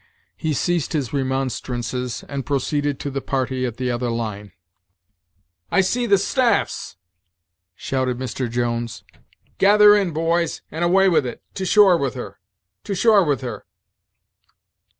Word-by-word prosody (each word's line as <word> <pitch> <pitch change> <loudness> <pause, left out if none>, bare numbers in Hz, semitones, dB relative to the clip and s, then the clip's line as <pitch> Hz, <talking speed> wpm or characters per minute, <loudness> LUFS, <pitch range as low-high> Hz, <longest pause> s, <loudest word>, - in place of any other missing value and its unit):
He 160 -1 -2
ceased 175 +2 -1
his 145 -6 -2
remonstrances, 130 -2 -3
and 140 -1 -4
proceeded 145 +1 -1
to 140 - -4
the 135 0 -3
party 130 -1 -1
at 120 -1 -7
the 125 -1 -1
other 120 0 -2
line. 105 -4 -4 1.2
"I 195 - +3
see 235 +6 0
the 200 -2 +5
'staffs,'" 245 +5 0 0.8
shouted 130 +4 -2
Mr. 130 -1 -3
Jones 120 0 -2 0.6
"gather 210 +1 +7
in 200 -3 +1
boys, 165 +1 -1
and 160 +2 -3
away 190 +3 +4
with 165 -8 +2
it; - - -8
to 190 - -3
shore 200 -4 +6
with 135 -6 -2
her! - - -8 0.5
to 200 - -3
shore 210 0 +5
with 145 -5 0
her!" 125 -2 -7
140 Hz, 140 wpm, -21 LUFS, 125-180 Hz, 1.2 s, gather